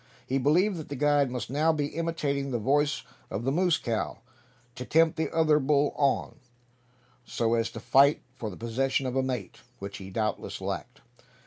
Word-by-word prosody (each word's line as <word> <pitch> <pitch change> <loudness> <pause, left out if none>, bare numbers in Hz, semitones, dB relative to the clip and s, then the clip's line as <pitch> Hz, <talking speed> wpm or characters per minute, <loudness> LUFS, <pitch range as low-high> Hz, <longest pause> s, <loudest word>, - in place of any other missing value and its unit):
He 135 +1 0
believed 175 +9 +3
that 155 - -8
the 145 - -4
guide 145 0 +3
must 125 -1 -5
now 155 +4 +3
be 150 -2 -1
imitating 150 -4 -2
the 125 - -1
voice 140 +5 +1 0.3
of 110 - -4
the 135 - +1
moose 175 +1 +2
cow, 115 -3 -2 0.6
to 125 - -6
tempt 160 +4 +3
the 160 -2 -2
other 155 -2 +3
bull 145 0 +2
on 140 +1 0 0.8
so 115 -1 -1
as 115 -1 +1
to - - -8
fight 140 +4 +4
for 115 -4 -5
the 90 - -9
possession 130 +4 -1
of 130 0 -2
a 135 - +3
mate, 125 -7 -4 0.2
which 100 0 -7
he 95 -1 -8
doubtless 110 +2 -2
lacked. 100 +8 -5
135 Hz, 185 wpm, -28 LUFS, 120-150 Hz, 0.8 s, fight